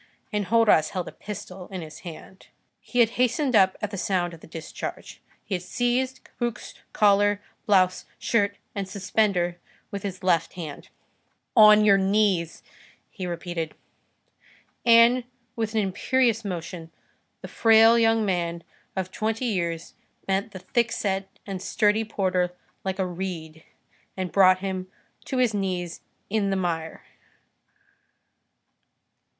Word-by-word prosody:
Enjolras 210 -5 +3
held 185 -3 -4
a - - -6
pistol 195 -3 -8
in 185 -3 -6
his 155 -1 -10
hand. 180 +2 -11 0.3
He 245 - 0
had 230 -1 +4
hastened 255 +1 +2
up 190 -2 +5
at 210 - -2
the 200 - -4
sound 175 -3 0
of 165 - -11
the - - -14
discharge. 160 0 -7 0.2
He 205 - -5
had 180 - -1
seized 250 +6 -1
Cabuc's 240 -2 -5 0.2
collar, 205 0 +4 0.3
blouse, 185 -3 +3
shirt, 205 -3 +1 0.2
and 195 -2 -4
suspender 190 -3 0 0.3
with 200 - -4
his 190 -1 -6
left 170 -3 +2
hand. 160 -5 -8 0.7
"On 215 -1 +8
your 200 -2 +6
knees!" 190 -4 +1 0.5
he 185 -4 -5
repeated. 170 -2 -4 1.1
And, 235 +1 +6 0.3
with 225 -1 -2
an 220 - +3
imperious 230 +4 +1
motion, 175 -3 -5 0.5
the - - -7
frail 225 +1 +6
young 225 -1 +3
man 170 -3 -1 0.3
of 185 -1 -3
twenty 220 +4 -2
years 170 -7 -2 0.3
bent 195 +1 -1
the - - -8
thickset 200 -5 0 0.2
and 195 -2 -5
sturdy 215 +1 +2
porter 185 -4 0 0.3
like 190 -1 -2
a 190 - 0
reed, 170 -3 -6 0.5
and 185 -2 -3
brought 185 -1 +5
him 190 -1 -3 0.4
to 265 - -3
his 250 -3 +3
knees 180 -4 -3 0.3
in 200 -1 0
the 195 - +1
mire. 165 -3 -3
195 Hz, 135 wpm, -25 LUFS, 180-220 Hz, 1.1 s, On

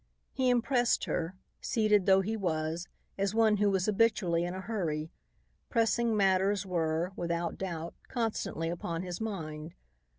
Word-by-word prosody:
He 260 -2 +2
impressed 245 0 +2
her, 170 +3 -2 0.3
seated 210 -4 +2
though 190 0 +6
he 215 +4 -2
was, 165 -3 -2 0.3
as 200 +2 0
one 220 -2 +4
who 205 0 +3
was 190 -2 +1
habitually 195 -6 +2
in 175 +1 -3
a 190 - -5
hurry. 165 -7 -2 0.6
Pressing 230 -1 +2
matters 195 +1 +2
were, 170 -1 0
without 170 0 -2
doubt, 170 -3 -4
constantly 220 -8 -2
upon 170 0 -3
his 180 +2 -5
mind. 160 -6 -5
190 Hz, 140 wpm, -31 LUFS, 170-215 Hz, 0.6 s, though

